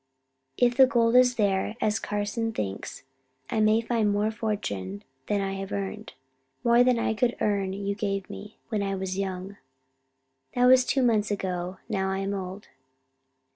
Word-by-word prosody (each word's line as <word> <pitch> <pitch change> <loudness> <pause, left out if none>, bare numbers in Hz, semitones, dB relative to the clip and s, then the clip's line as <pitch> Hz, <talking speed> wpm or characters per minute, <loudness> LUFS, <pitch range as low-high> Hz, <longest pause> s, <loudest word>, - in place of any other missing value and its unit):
If 245 -1 +3
the 265 - +8
gold 235 -2 +2
is 250 0 +6
there, 205 -1 0
as 215 +1 +1
Carson 210 +2 -2
thinks, 100 - -5 0.5
I 225 - 0
may 215 +1 +4
find 225 -2 +1
more 205 +2 +1
fortune 100 - -4 0.2
than 205 -1 +1
I 195 0 -2
have 195 0 -5
earned. 200 +2 -4 0.5
More 235 +1 +5
than 250 -1 +3
I 230 - 0
could 240 +2 0
earn 200 -2 0
you 200 0 -2
gave 195 -2 -2
me 210 +1 -10
when 215 -3 -1
I 195 -1 -1
was 190 0 -3
young. 190 +1 -4 1.0
That 245 0 +4
was 255 0 +6
two 265 +1 +1
months 220 -3 +2
ago. 185 -2 -3
Now 190 -2 -1
I 190 - -1
am 195 +1 -2
old. 190 +1 -6
205 Hz, 170 wpm, -27 LUFS, 195-230 Hz, 1.0 s, the